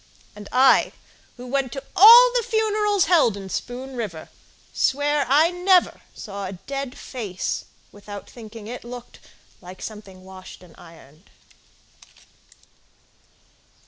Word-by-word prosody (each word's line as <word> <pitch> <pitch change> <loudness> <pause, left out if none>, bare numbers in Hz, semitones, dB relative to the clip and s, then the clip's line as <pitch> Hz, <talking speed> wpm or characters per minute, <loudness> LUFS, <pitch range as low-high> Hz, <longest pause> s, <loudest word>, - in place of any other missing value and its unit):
And 205 -1 -11
I, 260 +1 +4 0.4
who 245 - -10
went 265 0 -2
to 270 - -7
all 475 +6 +9
the - - +1
funerals 425 -3 0
Held 315 - +3
in 195 -1 -9
Spoon 255 +6 -6
River, 200 -10 -6 0.4
swear 290 +1 0
I 310 +5 +4
never 360 0 +2
Saw 200 -1 -7
a 190 - -7
dead 275 +7 -7
face 210 -8 -5 0.3
without 205 -1 -11
thinking 225 -2 -12
it 245 +3 -8
looked 245 0 -11 0.4
Like 180 +1 -12
something 200 -4 -10
washed 185 -1 -13
and 175 -3 -18
ironed. 165 -1 -18
245 Hz, 120 wpm, -22 LUFS, 200-295 Hz, 0.4 s, all